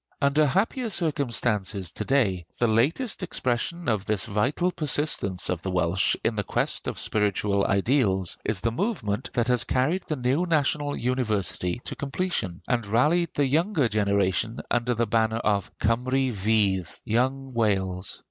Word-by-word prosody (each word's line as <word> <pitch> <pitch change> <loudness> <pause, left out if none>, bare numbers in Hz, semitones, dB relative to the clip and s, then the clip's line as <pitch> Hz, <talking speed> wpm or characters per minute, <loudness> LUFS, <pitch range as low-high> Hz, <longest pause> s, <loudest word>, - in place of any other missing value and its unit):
Under 145 +2 +3
happier 225 - 0
conditions 115 - 0
to - - -4
day, 95 -11 +1
the 120 - +2
latest 145 - +1
expression 170 +1 -2
of 110 -5 +1
this 105 -4 0
vital 130 - 0
persistence 145 - 0
of 90 -2 -2
the 95 - -3
Welsh 90 +1 +2
in 115 - +1
the 105 - -1
quest - - -2
of - - -3
spiritual 100 -1 +1
ideals 100 -3 +1
is 105 -4 -1
the 115 - 0
movement 130 - -2
that 120 0 +1
has 125 -2 +2
carried 150 +9 +1
the 155 - -1
new 135 +7 0
national 145 -2 +1
university 110 -5 -1
to - - -4
completion, 135 - -3
and 120 -4 0
rallied 150 +11 +2
the 145 - +2
younger 160 - +2
generation 100 +1 0
under 120 0 +1
the 120 +1 +1
banner 110 0 +1
of 105 -3 0
"Cymru 125 +3 +1
Fydd" 100 -3 0
(Young 130 +4 0
Wales). 95 -5 -1
120 Hz, 150 wpm, -26 LUFS, 100-140 Hz, -, Under